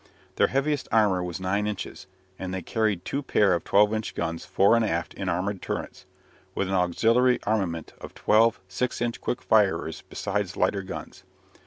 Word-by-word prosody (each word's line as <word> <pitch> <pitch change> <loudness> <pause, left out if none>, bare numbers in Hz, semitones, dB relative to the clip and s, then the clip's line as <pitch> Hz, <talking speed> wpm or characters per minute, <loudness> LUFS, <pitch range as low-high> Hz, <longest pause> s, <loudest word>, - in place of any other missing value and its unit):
Their - - +4
heaviest 140 +1 0
armour 100 -5 +3
was 90 0 -4
nine 100 +3 0
inches, 105 -3 -6 0.3
and 95 -1 -4
they 95 -1 -4
carried 105 -5 -1
two 140 - -2
pair 105 -8 +3
of 85 - -1
12 105 +2 +4
inch 110 0 -3
guns 80 0 -3
fore 100 +4 +4
and 115 - +3
aft 85 -5 -2
in 95 -2 -4
armoured 95 +2 -2
turrets, - - -5 0.5
with 100 - 0
an 95 - -2
auxiliary 115 +8 +3
armament 95 -7 -1
of - - -10
twelve 115 +1 +3
6 120 +7 -2
inch 120 -1 -2
quick 125 - -3
firers 95 -7 +2
besides - - -3
lighter 100 - +1
guns. 95 - -8
100 Hz, 175 wpm, -26 LUFS, 90-110 Hz, 0.5 s, Their